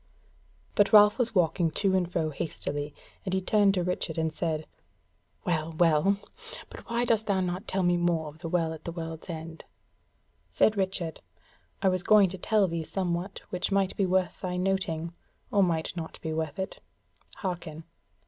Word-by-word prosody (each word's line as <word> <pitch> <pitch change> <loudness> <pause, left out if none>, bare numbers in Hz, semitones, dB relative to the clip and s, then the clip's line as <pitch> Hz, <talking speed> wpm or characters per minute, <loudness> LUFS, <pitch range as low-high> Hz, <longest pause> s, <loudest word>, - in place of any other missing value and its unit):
But 205 -1 +3
Ralph 210 +2 +7
was 230 -2 0
walking 170 -1 +3
to 190 +4 +1
and 180 -2 0
fro 160 -3 0
hastily, 145 -1 -2 0.3
and 190 -1 -1
he - - +2
turned 200 +1 +3
to 180 - +1
Richard 175 -2 -2
and 160 -1 0
said: 155 -2 -2 0.8
"Well, 165 -3 -1
well! 165 +4 +3 0.5
but - - -11
why 235 +1 +1
dost 225 -2 +1
thou 200 -2 +2
not 185 +3 -2
tell 190 0 0
me 175 0 +3
more 170 -2 +1
of 150 +1 -11
the 165 0 -5
Well 165 -2 +1
at 160 - -10
the 170 - -3
World's 165 0 -7
End?" 160 0 -7 0.9
Said 215 - +3
Richard: 190 -4 -2 0.6
"I 190 - +5
was 185 -1 0
going 205 -1 +6
to 190 +1 -7
tell 210 0 +3
thee 170 -1 -2
somewhat 180 +2 -3
which 180 +2 -1
might 195 -1 +1
be 195 - +1
worth 185 0 0
thy 180 -1 -2
noting; 180 -3 -1 0.4
or 200 - +4
might 170 -2 +1
not 165 -2 -6
be 160 - -3
worth 155 -2 -3
it: 190 0 -4 0.6
hearken! 170 -4 -5
180 Hz, 175 wpm, -28 LUFS, 160-195 Hz, 0.9 s, Ralph